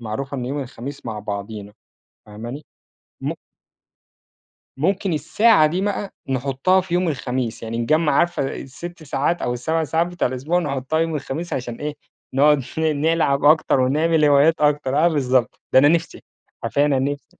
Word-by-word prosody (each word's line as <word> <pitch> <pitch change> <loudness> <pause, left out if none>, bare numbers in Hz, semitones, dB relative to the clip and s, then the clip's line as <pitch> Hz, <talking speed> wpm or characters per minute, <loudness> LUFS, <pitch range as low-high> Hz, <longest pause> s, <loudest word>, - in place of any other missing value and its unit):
معروفة 135 +5 -4
إن 125 - -3
يوم 140 +3 -3
الخميس 135 +1 -8
مع 110 -2 -4
بعضينا، 105 0 -6 0.5
فاهماني؟ 120 +8 -8 0.6
مُمك - - -3 1.4
مُمكن 190 +6 0
الساعة 160 +4 +4
دي 170 +5 -1
بقى 205 0 -3
نُحطها 135 +8 +1
في 180 -1 -4
يوم 180 0 +1
الخميس، 130 -5 -3
يعني 115 0 -4
نجَمَّع 155 +6 +2
عارفة 170 -3 +1
ال6 170 +6 -9
ساعات 150 +3 -1
أو 120 - 0
ال7 160 +7 -1
ساعات 160 +3 +1
بتوع 175 -4 -1
الأسبوع 135 +8 -1
نحطها 140 -1 -2
يوم 165 0 0
الخميس 150 +4 -5
عشان 125 -2 -3
إيه، 150 +2 -4 0.4
نقعد 145 +2 +5 0.2
ن - - 0
نلعب 155 -2 +1
أكتر 150 -2 +4
ونعمل 155 +5 +2
هوايات 145 +2 +5
أكتر. 145 -2 +1
آه، - - +6
بالضبط. 130 -6 0
ده - - +7
أنا 145 +2 +6
نِفسي، 165 +1 0 0.4
حرفيًا 145 +1 +1
أنا 140 -2 +2
نِفسي، 140 +2 -2
145 Hz, 160 wpm, -21 LUFS, 130-165 Hz, 1.4 s, ده